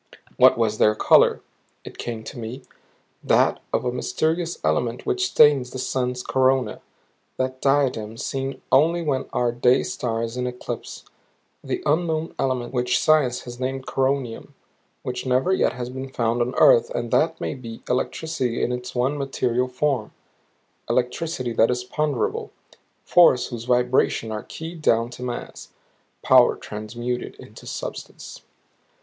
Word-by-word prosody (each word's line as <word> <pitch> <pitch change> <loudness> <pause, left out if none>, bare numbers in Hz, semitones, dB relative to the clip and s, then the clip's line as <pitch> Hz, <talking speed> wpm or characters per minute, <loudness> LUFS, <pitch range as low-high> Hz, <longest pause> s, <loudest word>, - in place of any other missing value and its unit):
What - - +6
was 110 -2 0
their 105 0 +4
color? - - +4 0.4
It - - -11
came 115 -2 -5
to 120 +3 -8
me 120 +4 -7 0.6
that - - +3
of - - 0
the 125 - 0
mysterious 160 +7 -1
element 115 +11 0
which 380 0 0
stains 145 - +5
the 130 - -7
sun's 125 -1 -2
corona, 130 0 +1 0.6
that 130 0 -2
diadem 130 -6 +1
seen 135 +2 -4
only 165 +5 +4
when 135 -4 -1
our 120 -1 +1
day 125 +1 +3
star 120 -2 -2
is 115 +2 -5
in 125 0 -1
eclipse; 125 0 -7 0.6
the - - -3
unknown 160 +1 0
element 130 -2 -1
which 125 -1 +1
science 145 -6 +3
has 120 0 -9
named 130 +1 -3
coronium, 135 -3 -2 0.5
which 125 +1 -4
never 130 +9 +2
yet - - +2
has 125 -1 -5
been 130 +1 -6
found 120 -2 0
on 125 +2 -1
earth 475 -2 +5
and - - -4
that - - +2
may - - -3
be 115 -4 -9
electricity 130 -1 -1
in - - 0
its 125 0 -5
one 130 +4 0
material 125 -2 0
form; 125 -3 -1 0.8
electricity 125 0 -1
that 115 0 +4
is 125 0 -1
ponderable; 145 -1 -2 0.6
force 165 -8 +5
whose 120 -2 -6
vibrations 125 -2 +1
are 105 -1 -3
keyed 165 0 -8
down 115 -4 +2
to 125 - -10
mass; 125 -1 -6 0.5
power - - +6
transmuted 120 +4 -5
into - - -13
substance. - - -7
125 Hz, 145 wpm, -23 LUFS, 120-140 Hz, 0.8 s, What